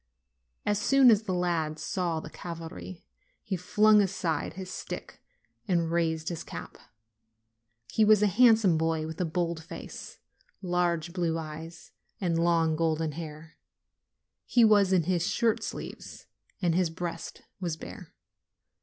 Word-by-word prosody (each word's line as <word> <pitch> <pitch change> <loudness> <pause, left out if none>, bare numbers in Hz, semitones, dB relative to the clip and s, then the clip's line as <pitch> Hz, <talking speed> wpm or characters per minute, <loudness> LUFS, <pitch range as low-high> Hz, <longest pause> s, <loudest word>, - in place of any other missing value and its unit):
As 205 -1 +1
soon 265 +3 +6
as 215 -2 +4
the 205 -4 -3
lad 165 -3 0
saw 170 0 -2
the 155 - -9
cavalry, 165 +1 -8 0.4
he 200 -4 -2
flung 210 +4 +4
aside 185 -4 -1
his 185 -1 -7
stick - - -7 0.5
and 170 -3 +1
raised 160 -1 0
his 170 -3 -5
cap. - - -9 1.1
He 220 - +3
was 210 -1 +5
a - - +6
handsome 220 -5 +5
boy, 160 -1 0
with 160 +2 -5
a - - +1
bold 170 0 -2
face, - - -9 0.4
large 175 -2 0
blue 170 -3 0
eyes 160 +1 -8 0.3
and 170 -4 +1
long, 165 -2 +3
golden 160 -1 0
hair. 155 +1 -9 0.9
He 240 -2 +5
was 205 -3 +5
in 180 -3 +4
his 175 0 0
shirt 230 -2 +1
sleeves - - -7 0.4
and 170 -2 +3
his 180 -1 +2
breast 170 0 -6 0.2
was 170 -4 -3
bare. - - -10
170 Hz, 140 wpm, -28 LUFS, 160-190 Hz, 1.1 s, soon